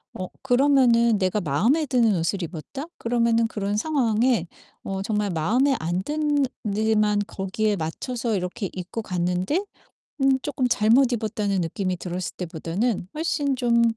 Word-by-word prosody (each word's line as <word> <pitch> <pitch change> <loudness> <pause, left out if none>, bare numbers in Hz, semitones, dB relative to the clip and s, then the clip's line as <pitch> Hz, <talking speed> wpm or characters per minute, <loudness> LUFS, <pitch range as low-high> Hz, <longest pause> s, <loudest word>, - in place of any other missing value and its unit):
어 185 - -4 0.2
그러면은 245 -4 +4
'내가 190 +2 0
마음에 210 - +2
드는 230 -6 +3
옷을 170 +4 -1
입었다.' 175 - -6
그러면은 230 -1 +2
그런 205 -2 -2
상황에 235 - +1 0.4
어 195 0 -3
정말 210 -1 -1
마음에 245 - +2
안 175 +3 -2
드는 295 -1 +1 0.3
데만 215 -1 +2
거기에 205 +1 -1
맞춰서 225 +8 -3
이렇게 185 +1 -3
입고 185 +5 -5
갔는데 180 - -1 0.6
음 270 0 +4
쪼끔 265 -3 -1
'잘못 240 +3 +4
입었다.'는 210 -4 -1
느낌이 185 +2 -2
들었을 180 -1 -5
때보다는 180 +5 -2
훨씬 300 -3 0
좀 235 -2 +2
215 Hz, 315 characters per minute, -24 LUFS, 185-250 Hz, 0.6 s, 그러면은